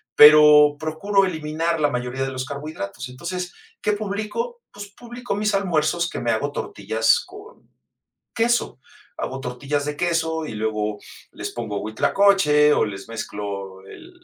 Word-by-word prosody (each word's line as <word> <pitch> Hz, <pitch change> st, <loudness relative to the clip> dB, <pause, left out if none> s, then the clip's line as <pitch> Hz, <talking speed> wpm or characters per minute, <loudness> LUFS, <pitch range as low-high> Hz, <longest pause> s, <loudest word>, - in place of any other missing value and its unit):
pero 150 Hz, -1 st, +8 dB
procuro 195 Hz, +6 st, +1 dB
eliminar 160 Hz, -1 st, -2 dB
la 145 Hz, -, +3 dB
mayoría 125 Hz, 0 st, -3 dB
de 135 Hz, -, -3 dB
los 130 Hz, 0 st, -4 dB
carbohidratos. 140 Hz, -5 st, -6 dB
Entonces, 175 Hz, +7 st, -5 dB, 0.3 s
¿qué 210 Hz, -, +1 dB
publico? 215 Hz, -, -4 dB
Pues 205 Hz, 0 st, -9 dB
publico 240 Hz, +2 st, -6 dB
mis 210 Hz, 0 st, 0 dB
almuerzos 170 Hz, -3 st, +1 dB
que -, -, -5 dB
me 115 Hz, -, 0 dB
hago 145 Hz, +6 st, -1 dB
tortillas 110 Hz, 0 st, +1 dB
con 410 Hz, +5 st, -14 dB, 0.7 s
queso. 235 Hz, -, 0 dB, 0.4 s
Hago 130 Hz, +1 st, -4 dB
tortillas 140 Hz, +3 st, -3 dB
de 150 Hz, 0 st, -4 dB
queso 160 Hz, -2 st, 0 dB
y -, -, -6 dB
luego 105 Hz, -1 st, -2 dB, 0.3 s
les -, -, -6 dB
pongo 100 Hz, -1 st, -4 dB
huitlacoche 150 Hz, -, +3 dB
o -, -, +2 dB
les 100 Hz, +1 st, -8 dB
mezclo 100 Hz, -4 st, -6 dB
el 345 Hz, -, -12 dB
150 Hz, 145 wpm, -22 LUFS, 125-195 Hz, 0.7 s, pero